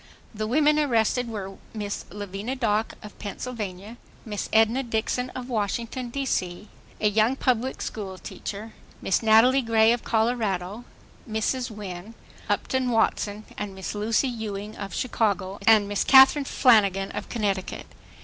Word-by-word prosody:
The 215 0 -3
women 300 +5 +3
arrested 245 -3 +1
were 195 -3 -6 0.2
Miss 205 -1 -4
Lavinia 205 +5 -5
Dock 220 -3 0
of 210 - -12
Pennsylvania, 210 -1 -6 0.3
Miss 210 -3 -4
Edna 225 +4 +4
Dixon 240 +1 -2
of 250 -1 -5
Washington, 235 +2 -2
D. 275 +3 -3
C., 185 -3 -2 0.3
a 210 - +2
young 220 +4 +3
public 255 -1 0
school 195 -3 -5
teacher; 210 +4 -7 0.3
Miss 195 - +1
Natalie 230 +4 +5
Gray 225 -1 +4
of 240 - -3
Colorado, 220 -2 -1 0.4
Mrs. 240 +4 -1
Win. 205 0 -8 0.3
Upton 260 -1 0
Watson 215 -2 0
and 205 -2 -5
Miss 190 - -5
Lucy 220 +5 +1
Ewing 215 -3 -5
of 200 -1 -6
Chicago, 200 -5 -1
and 215 -2 +6
Miss 205 0 0
Catherine 270 +2 +7
Flanagan 200 -8 +3
of - - -6
Connecticut. 200 -5 -2
220 Hz, 140 wpm, -25 LUFS, 205-245 Hz, 0.4 s, Catherine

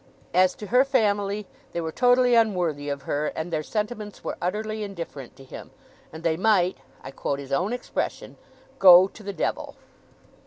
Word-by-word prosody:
As 185 +1 +4
to 210 - -8
her 250 +5 +4
family, 210 -6 0 0.3
they - - -2
were 160 -1 -4
totally 245 +3 +3
unworthy 180 -11 +1
of 140 -1 -4
her, 145 +2 -1
and 165 +2 -4
their 155 - 0
sentiments 210 +3 -4
were - - -3
utterly 215 +4 -2
indifferent 170 - -7
to 135 - -14
him, 130 - -10 0.4
and 160 +1 -10
they 165 -1 +1
might 190 -2 +2 0.2
I 135 - -8
quote 140 +1 -3
his 140 -1 -9
own 180 +10 0
expression 245 0 -4 0.4
go 185 -1 +9
to 220 - -15
the 200 -1 -5
Devil. 185 - -3
190 Hz, 170 wpm, -25 LUFS, 160-215 Hz, 0.4 s, go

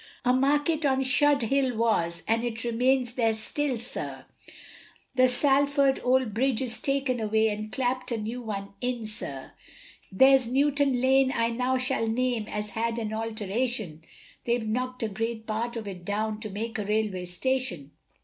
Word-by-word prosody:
A 250 - +4
market 290 +4 +2
on 270 -2 +2
Shudehill 270 -2 +2
was, 195 -7 0
and 230 +1 +1
it 230 -1 -3
remains 245 +1 +1
there 225 -3 +1
still, 265 +4 0
sir, 240 +3 -3 0.9
The 255 0 +4
Salford 280 +1 +3
old 255 -3 +2
bridge 255 +1 +1
is 255 -3 0
taken 275 -3 0
away, 220 0 +2
and 215 +1 -5
clapt 255 -1 -2
a 235 - 0
new 225 +3 -5
one 200 -4 -6
in, 245 -2 -2
sir, 140 -11 -3 0.6
There's 265 +4 +5
Newton 275 0 +2
lane 265 0 +4
I 230 0 +1
now 250 +2 0
shall 255 -2 +1
name, 235 -1 -1
has 210 -1 -4
had 230 +1 -2
an 220 -2 -3
alteration, 220 -5 -3 0.4
They've 235 -2 0
knock'd 250 +2 -2
a - - +1
great 225 +2 -4
part 230 +2 -3
of 225 -3 -5
it 185 -3 -7
down, 215 +2 -2
to 215 -1 -6
make 225 +3 -4
a 205 - -3
railway 210 -3 -1
station. 180 - -2
235 Hz, 160 wpm, -27 LUFS, 220-260 Hz, 0.9 s, There's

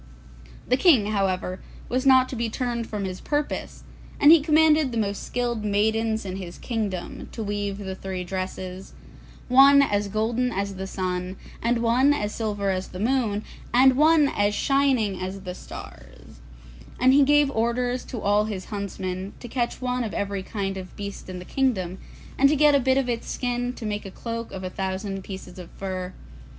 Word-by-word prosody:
The 255 - +3
King, 255 - +4
however, 185 -2 -1 0.3
was 255 +2 0
not 260 -1 +6
to - - -5
be 235 -1 -1
turned 235 -1 -2
from 205 -2 -3
his 185 -1 -5
purpose, 295 0 -3 0.4
and 290 - +8
he 330 -2 +8
commanded 310 -2 +4
the 230 - -3
most 200 -2 -1
skilled 240 -3 -2
maidens 220 +1 +1
in 190 0 -4
his 180 -2 -7
kingdom 210 -7 -4
to 225 - -4
weave 205 -1 -2
the 190 -2 -5
three 190 -1 -5
dresses, 185 0 -5 0.5
one 275 +2 +7
as 205 -5 0
golden 225 +4 0
as 200 0 -2
the 190 0 -5
sun, 185 -1 -3 0.3
and 235 0 +1
one 255 +5 +4
as 210 -5 -2
silver 205 -3 -1
as 185 0 -2
the 185 - -9
moon, 220 -2 0 0.3
and 260 +1 +6
one 305 +1 +5
as 205 -4 +1
shining 260 -9 +2
as 190 +1 -5
the 180 -1 -6
stars; - - -12 0.6
and 255 +1 +5
he 285 - +6
gave 290 0 +4
orders 245 +1 0
to 240 - -6
all 205 +1 +2
his 200 -4 -5
huntsmen 190 -1 -4
to 245 - -8
catch 240 +1 -2
one 250 0 0
of 220 - -4
every 200 -1 -2
kind 195 0 -4
of 185 -1 -8
beast 200 -1 -7
in 185 - -5
the 180 - -8
kingdom, 190 -10 -1 0.4
and 275 +1 +6
to 305 - +3
get 300 0 +5
a 280 - +5
bit 260 0 +2
of 270 -2 +1
its 235 -1 -3
skin 245 0 -2
to 235 - -8
make 210 0 -2
the 195 - -8
cloak 230 +3 -6
of 190 -1 -6
a 185 - -3
thousand 190 +1 -3
pieces 190 -2 -9
of 175 - -9
fur. 185 -1 -4
215 Hz, 185 wpm, -25 LUFS, 190-250 Hz, 0.6 s, and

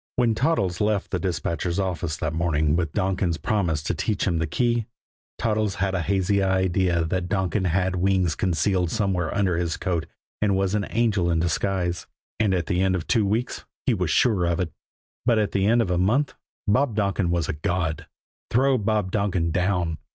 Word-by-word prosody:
When 120 -2 +2
Toddles 110 - 0
left 105 -1 0
the 90 - 0
dispatcher's 85 -1 -2
office 85 -5 -2
that 80 0 -2
morning 80 -2 +1
with 85 -3 -1
Donkin's 95 -3 0
promise 85 -6 0
to - - -1
teach 105 -3 -1
him 85 -4 0
the 80 - -1
key, 120 +5 0 0.5
Toddles 110 -3 0
had 95 +1 -1
a 95 - 0
hazy 100 +2 +1
idea 95 -2 +1
that 90 +2 -2
Donkin 95 0 0
had 90 +1 +1
wings 95 -2 +2
concealed 90 +1 0
somewhere 95 -6 0
under 95 -4 +1
his 85 -2 -1
coat 85 -3 -2 0.3
and 100 -2 +2
was 95 0 0
an 105 -1 0
angel 105 -6 +1
in 85 -1 +2
disguise; 90 +1 -1 0.3
and 105 -3 +2
at 85 -2 -1
the 90 +3 0
end 95 0 +2
of 85 - -3
two 110 -5 +2
weeks 115 +5 -1 0.2
he 125 - +3
was 90 -6 -1
sure 100 -1 +3
of 85 -1 0
it. 90 -4 -1 0.5
But 120 -2 +3
at 105 -2 +1
the 100 0 +1
end 115 +2 +4
of 90 - -3
a 90 - +1
month 120 +10 +2 0.3
Bob 120 +2 +2
Donkin 100 -3 0
was 85 -2 0
a - - -1
god! 80 +1 -2 0.4
Throw 130 +1 +3
Bob 105 -2 0
Donkin 95 -5 0
down! 90 -2 0
95 Hz, 190 wpm, -24 LUFS, 85-105 Hz, 0.5 s, end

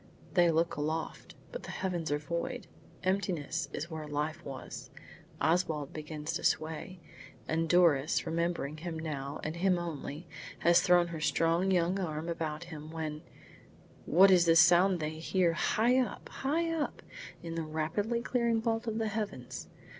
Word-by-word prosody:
They 175 -2 +5
look 165 0 +1
aloft, 155 +2 -3 0.2
but - - -6
the - - -9
heavens 175 -5 -2
are 145 - +2
void. 170 - -4 0.4
Emptiness 180 -4 -1
is 170 +3 -5
where 155 -1 -5
life 150 +3 -2
was. 135 -1 -7 0.5
Oswald 160 -4 +1
begins 150 0 -5
to - - -3
sway, 160 +4 -1 0.5
and 165 0 0
Doris, 165 -5 +4
remembering 170 -3 -1
him 165 0 -5
now 145 -3 -4
and 155 +2 -3
him 185 0 +3
only, 165 -1 -5 0.3
has 170 +1 +6
thrown 175 -1 +4
her 160 -2 -5
strong 165 +4 +2
young 180 +1 +2
arm 160 -2 -3
about 160 -1 -3
him, 155 -3 -9
when 155 -2 -4 0.9
What 190 +4 +7
is 180 -2 +6
this 165 -1 +6
sound 175 +1 +6
they 155 +1 -3
hear 170 +1 +2
high 240 +8 +3
up, 250 -5 -3
high 330 +5 -1
up, 310 -3 -3 0.4
in 165 -1 -5
the 165 - -2
rapidly 165 +9 -1
clearing 235 -3 +1
vault 225 +1 -1
of 220 -1 -1
the 220 -1 0
heavens! 215 0 -5
170 Hz, 155 wpm, -31 LUFS, 155-185 Hz, 0.9 s, What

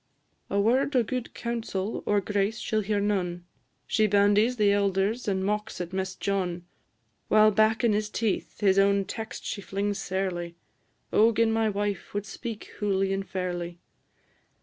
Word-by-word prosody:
A 200 - +1
word 255 +7 +2
o' 245 - +5
gude 250 +1 -4
counsel 225 -4 -3
or 205 -1 +3
grace 205 +2 0
she - - -3
'll 215 - +3
hear 210 0 0
none; 180 -4 -1 0.4
She 215 -1 +2
bandies 205 +4 +3
the 205 -2 +4
elders, 200 +3 +1
and 190 -1 0
mocks 210 0 -2
at 175 0 -5
Mess 190 0 -2
John; 180 -3 -2 0.6
While 215 0 +6
back 220 +3 +3
in 230 -3 +4
his 210 0 0
teeth 220 -1 -2
his 195 -1 +4
own 200 0 +3
text 225 +2 -6
she 200 - -3
flings 200 +2 -2
sairly. 180 -3 -3 0.6
O 225 +2 +6
gin 230 0 +2
my 225 -1 +2
wife 205 -1 -3
wad 205 0 -1
speak 215 +2 -6 0.2
hooly 195 -2 +1
and 195 0 -3
fairly! 175 -2 -3
205 Hz, 165 wpm, -27 LUFS, 190-215 Hz, 0.6 s, While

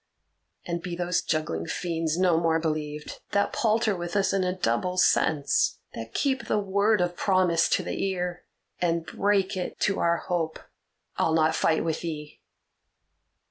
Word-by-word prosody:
And 170 -1 -3
be 175 0 -4
those 175 0 0
juggling 85 - -2
fiends 165 -2 -2
no 180 -3 +3
more 165 -1 +2
believed, 150 -2 -3
that 200 - +1
palter 220 -2 +2
with 175 0 -5
us 195 -2 +2
in 195 -1 +2
a 180 - +1
double 180 +1 -1
sense; 150 -5 +2 0.2
that 115 0 -8
keep 270 -2 0
the - - +1
word 200 +1 +2
of 175 0 0
promise 185 -4 +2
to - - +1
the - - -3
ear, 180 -2 -3 0.4
and 170 -1 +1
break 195 +3 +1
it 185 - -4
to 195 - +1
our 170 0 +2
hope. 165 -3 -2 0.6
I'll 160 - +2
not 160 0 +3
fight 160 0 +2
with 160 -1 -2
thee!" 150 -3 -6
175 Hz, 160 wpm, -26 LUFS, 160-190 Hz, 0.6 s, no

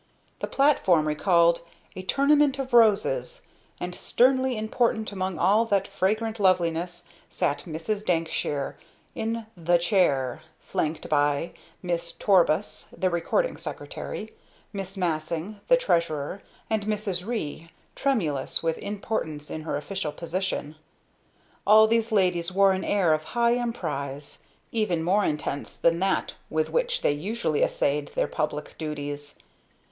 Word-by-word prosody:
The - - -3
platform 190 - +3
recalled 170 +2 +3 0.3
a 185 - -5
"tournament 280 +6 +3
of 265 -2 -5
roses," 240 - +3 0.4
and, 180 0 -4
sternly 260 +4 +2
important 220 0 0
among 190 -3 -3
all 210 +7 +4
that 200 -3 +1
fragrant 220 +4 -1
loveliness, 175 -2 +1 0.3
sat 145 0 -1
Mrs. 175 +6 -3
Dankshire 165 -5 -1 0.4
in 225 0 -3
"the 175 0 +3
chair" 170 - +1 0.2
flanked 155 0 -3
by 145 +1 +1 0.3
Miss 170 -1 -2
Torbus, 185 -2 +2
the 185 -1 -1
Recording 175 - 0
Secretary, - - -6 0.4
Miss 195 0 -5
Massing, 170 +3 -2
the - - +6
Treasurer, 170 - 0 0.3
and 215 -2 -1
Mrs. 205 -4 -1
Ree, 165 -8 -4 0.3
tremulous 170 - 0
with 165 -1 0
importance 195 -8 -4
in 155 - -4
her 155 -2 -2
official 155 +2 -3
position. 170 -3 -3 0.9
All 215 +1 +8
these 225 +1 +1
ladies 180 -4 +2
wore 195 +1 +5
an 190 0 -1
air 185 -6 +3
of 155 0 -1
high 235 0 +4
emprise, 145 - -3 0.3
even 190 -8 0
more 195 +5 +3
intense 150 -3 -3
than 170 0 +2
that 195 +1 0 0.2
with 155 0 0
which - - 0
they - - +4
usually 160 +1 -1
essayed 145 0 +1
their - - +2
public 150 0 -3
duties. 145 -2 -5
185 Hz, 130 wpm, -26 LUFS, 155-220 Hz, 0.9 s, All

